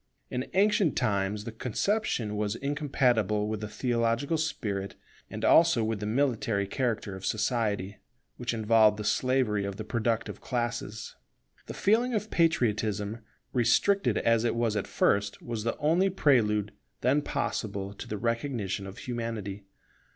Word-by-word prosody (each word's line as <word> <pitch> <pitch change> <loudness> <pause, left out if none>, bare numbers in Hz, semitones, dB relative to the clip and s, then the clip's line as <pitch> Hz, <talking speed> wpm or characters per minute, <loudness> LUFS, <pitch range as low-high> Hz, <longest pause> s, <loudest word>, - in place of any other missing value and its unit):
In 125 +1 -3
ancient 200 -5 +3
times 105 -2 0
the 115 - -6
conception 120 - -1
was 105 0 -1
incompatible 125 -7 +1
with 110 -1 -3
the 105 - -3
theological 115 +5 0
spirit 105 -11 -2 0.3
and - - -4
also 165 -8 +5
with 110 -1 -1
the 105 - -3
military 115 -4 +1
character 115 -3 -2
of 95 - -10
society, 105 -2 -1 0.4
which 120 -1 -2
involved 110 -1 +4
the 105 - -4
slavery 125 -2 +1
of 100 0 -4
the 110 - -5
productive 115 +1 -2
classes. 120 -3 -3 0.5
The - - -6
feeling 235 +4 +2
of 215 0 -2
Patriotism, 110 - +1 0.3
restricted 135 - +3
as 115 -1 +2
it 120 - +1
was 115 -2 0
at 105 - -2
first, 100 0 +1
was 115 -3 -5
the 115 - -1
only 170 +6 +2
prelude 110 - +2 0.3
then 135 +4 +3
possible 100 -7 -3
to - - -9
the 105 - -4
recognition 115 -4 -2
of 95 - -9
Humanity. 115 -5 -5
115 Hz, 145 wpm, -28 LUFS, 105-130 Hz, 0.5 s, also